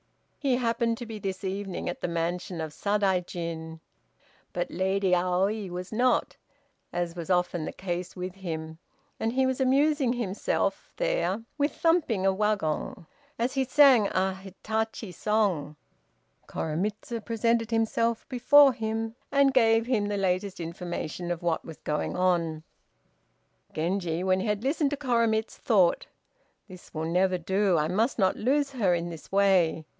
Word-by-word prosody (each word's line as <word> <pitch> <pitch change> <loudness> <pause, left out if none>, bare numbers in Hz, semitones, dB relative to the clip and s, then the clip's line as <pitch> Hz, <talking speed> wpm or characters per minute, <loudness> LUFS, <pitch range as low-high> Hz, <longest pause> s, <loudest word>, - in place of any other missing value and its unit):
He 270 -3 +2
happened 230 -1 0
to 240 - -6
be 220 -2 -7
this 190 -1 -4
evening 195 0 -4
at 175 - -4
the - - -1
mansion 170 +1 -2
of 155 -1 -5
Sadaijin, 175 -5 -1 0.7
but - - -3
Lady 190 0 +1
Aoi 185 +3 +1
was 180 +1 -6
not, 245 +3 +1 0.6
as 175 -1 -2
was 170 0 -6
often 180 -3 +1
the - - -4
case, 180 -1 -5
with 180 0 -5
him, 160 -4 -6 0.4
and 225 +1 -1
he 265 +1 +2
was 260 0 -1
amusing 275 0 +3
himself 215 -5 -2
there - - 0 0.2
with 290 +1 +1
thumping 320 - +2
a 195 - +4
wagon 195 -6 -1 0.3
as 240 +3 -1
he 270 -1 +1
sang 260 -5 +6
a 190 0 0
"Hitachi" 215 +2 -4
song. 185 -6 0 0.7
Koremitz 200 +9 -3
presented 230 0 0
himself 230 0 0
before 275 +2 +6
him, 225 0 -3 0.2
and 280 -1 +4
gave 225 -3 +4
him 225 -5 +1
the 205 0 -1
latest 190 0 -1
information 175 0 -5
of 175 -1 -3
what 170 -2 0
was 160 - -10
going 150 +3 -2
on. 170 -4 +1 1.1
Genji, 175 +1 -1
when 185 0 +2
he 190 - -2
had 210 +1 -1
listened 285 +2 +1
to 290 - -3
Koremitz, 230 -5 +1
thought, 190 -7 +2 0.6
"This 185 -3 -13
will 155 +1 -2
never 180 +2 +2
do; 190 +1 +1
I 150 0 +1
must 215 +9 0
not 190 -4 +2
lose 280 +4 +1
her 205 -9 +2
in 170 0 -3
this 165 -2 -11
way. 190 -5 +3
195 Hz, 150 wpm, -27 LUFS, 175-230 Hz, 1.1 s, sang